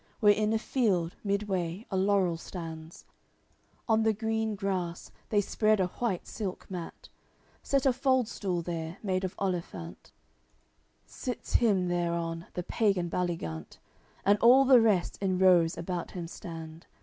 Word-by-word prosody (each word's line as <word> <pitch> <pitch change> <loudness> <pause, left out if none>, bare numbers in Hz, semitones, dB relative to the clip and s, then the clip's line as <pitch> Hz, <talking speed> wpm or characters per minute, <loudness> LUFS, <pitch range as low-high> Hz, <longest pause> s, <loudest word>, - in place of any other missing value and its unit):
Where 205 -1 +6
in 215 +1 0
a 225 - +3
field, 200 -8 0
midway, 200 -2 -2
a - - -1
laurel 190 -2 +2
stands, 165 -1 -8 0.8
On 220 -1 +3
the 220 0 +3
green 220 0 -1
grass 185 -4 -3 0.2
they 205 -2 +3
spread 215 +1 +2
a 185 - +3
white 220 -8 -1
silk 195 -4 -5
mat, 175 -3 -7 0.5
Set 275 -1 0
a 265 - +5
fald 260 -2 +2
stool 180 -6 -2
there, 165 0 -4
made 185 -2 0
of 185 - -3
olifant; 170 - -4 0.9
Sits 250 -2 -6
him 200 -6 +3
thereon 170 -1 -2
the 180 - -2
pagan 190 -4 0
Baligant, 165 - -3 0.5
And 200 +1 +4
all 255 +3 +7
the 255 -2 +7
rest 205 -6 +1
in 190 -2 +1
rows 180 -3 +4
about 175 0 -4
him 175 -2 -6
stand. 165 -2 -9
190 Hz, 145 wpm, -29 LUFS, 170-215 Hz, 0.9 s, all